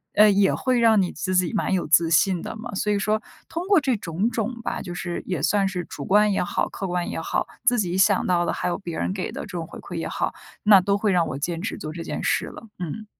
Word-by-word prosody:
呃， 210 0 +7
也 195 -1 +3
会 255 -2 +1
让 225 -3 +5
你 180 - -1
自 185 -1 -3
己 185 +3 +2
蛮 200 - 0
有 185 - 0
自 165 +1 +4
信 170 +2 +3
的 - - -6
嘛。 235 +1 -7
所 210 +2 0
以 205 - +2
说 215 +2 0 0.3
通 340 +3 -5
过 400 -3 +5
这 270 -4 +1
种 185 +3 -1
种 230 +1 -3
吧， - - -3
就 175 -3 -6
是 175 0 -4
也 180 -7 -2
算 200 -2 +2
是 185 -2 -3
主 140 - -7
观 210 +1 +4
也 195 - +1
好， - - -1
客 195 - -5
观 175 0 -2
也 - - -3
好， - - -1 0.2
自 245 -1 +3
己 180 -3 -1
想 190 - +4
到 175 -1 +2
的 - - 0
还 - - -2
有 175 - -1
别 175 -4 -6
人 - - -1
给 190 -2 -4
的 - - -6
这 - - -6
种 175 -5 -5
回 - - -10
馈 - - -8
也 - - -3
好， - - -2 0.3
那 205 -3 +7
都 200 +2 +1
会 205 0 +1
让 175 -3 +2
我 135 - -4
坚 165 +3 -3
持 205 - -4
做 155 - -6
这 170 - -6
件 - - -4
事 - - +1
了。 230 - -11
嗯。 180 +5 -5
195 Hz, 295 characters per minute, -24 LUFS, 175-215 Hz, 0.3 s, 呃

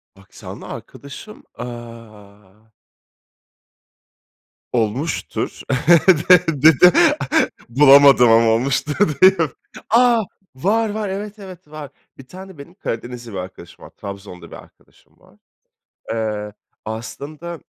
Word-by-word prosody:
Aksanlı 100 0 -12
arkadaşım, 140 +10 -11
aaa 110 -3 -12 2.0
Olmuştur. 125 +7 -3 0.7
De 180 -1 +7
Bir 150 -2 +3
de 180 - +7 0.8
Bulamadım 135 -1 +6
ama 115 0 +4
olmuştur, 135 +6 -1 0.3
deyip. 190 -1 +5 0.5
A! 235 0 +3 0.3
Var, 215 +10 0
var. 210 -1 -4
Evet, 205 +2 -7
evet, 185 -6 -12
var. 150 -3 -9 0.3
Bir 135 - -15
tane 190 0 -12
benim 140 +5 -13
Karadenizli 120 - -7
bir 95 - -7
arkadaşım 90 +1 -10
var. - - -13
Trabzonlu 100 -4 -11
bir - - -9
arkadaşım - - -20
var. - - -24 0.8
Eee, 105 -2 -4 0.3
aslında, 145 +9 -8
135 Hz, 100 wpm, -19 LUFS, 110-180 Hz, 2.0 s, De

